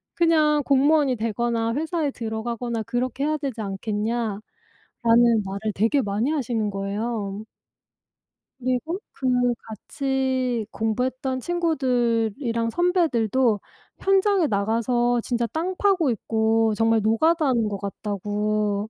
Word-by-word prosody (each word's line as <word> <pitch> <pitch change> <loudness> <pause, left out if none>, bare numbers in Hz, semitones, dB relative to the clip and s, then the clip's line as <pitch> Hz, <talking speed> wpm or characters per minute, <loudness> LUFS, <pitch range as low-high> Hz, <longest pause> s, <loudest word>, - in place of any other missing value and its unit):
그냥 310 -3 +3
공무원이 280 0 +3
되거나 230 +1 -1
회사에 315 +1 -1
들어가거나 230 0 -3
그렇게 255 +4 -2
해야 310 +1 +1
되지 270 -6 -4
않겠냐."라는 210 +2 -2 1.0
말을 200 +3 -3
되게 230 +8 +2
많이 210 +5 -1
하시는 235 -8 -1
거예요. 200 +1 -3 1.1
그리고 255 +8 -2
그 265 - -3 0.4
같이 260 +1 -1
공부했던 255 +4 -1
친구들이랑 245 -7 0
선배들도 260 - +2 0.4
현장에 390 -2 +3
나가서 235 +3 +1
진짜 235 0 -1
땅 335 - -3
파고 375 -8 +2
있고 225 0 +1
정말 225 0 +2
노가다 310 - +2
하는 235 -4 +2
것 200 - -3
같다고 205 +1 -2
235 Hz, 265 characters per minute, -24 LUFS, 220-275 Hz, 1.1 s, 그냥